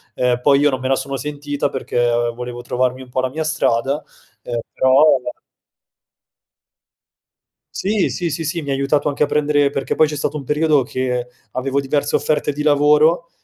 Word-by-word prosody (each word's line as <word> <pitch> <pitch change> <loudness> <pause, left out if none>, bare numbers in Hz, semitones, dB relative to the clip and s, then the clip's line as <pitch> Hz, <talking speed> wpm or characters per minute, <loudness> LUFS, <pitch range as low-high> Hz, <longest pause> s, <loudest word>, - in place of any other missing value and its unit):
ehm, 125 -1 +1
poi 140 +1 +4
io 145 0 +3
non 130 - -2
me 130 - -2
la 135 - +3
sono 140 +1 -4
sentita 145 +1 -3
perché, 130 -2 -2
ehm, 120 0 +1
volevo 120 0 -7
trovarmi 125 +1 -1
un 130 - -15
po' 130 +1 -1
la 130 - -1
mia 155 +5 -3
strada, 140 -2 0 0.4
ehm, 120 0 -4
però 130 +2 +4 2.7
Sì, 205 0 0
sì, 170 -2 -3
sì, 160 +3 -3
sì, 165 +2 -2
mi 140 - -4
ha - - +2
aiutato 140 +2 +1
anche 145 - 0
a - - +4
prendere 145 -1 +2
perché 140 -1 -2
poi 155 - +4
c'è 150 - -5
stato 145 +1 -2
un 140 - -6
periodo 150 +1 +2
che 125 -1 -2 0.2
avevo 135 +3 -1
diverse 145 +1 0
offerte 150 0 0
di 150 +1 -4
lavoro, 150 +3 +3
140 Hz, 185 wpm, -19 LUFS, 130-150 Hz, 2.7 s, poi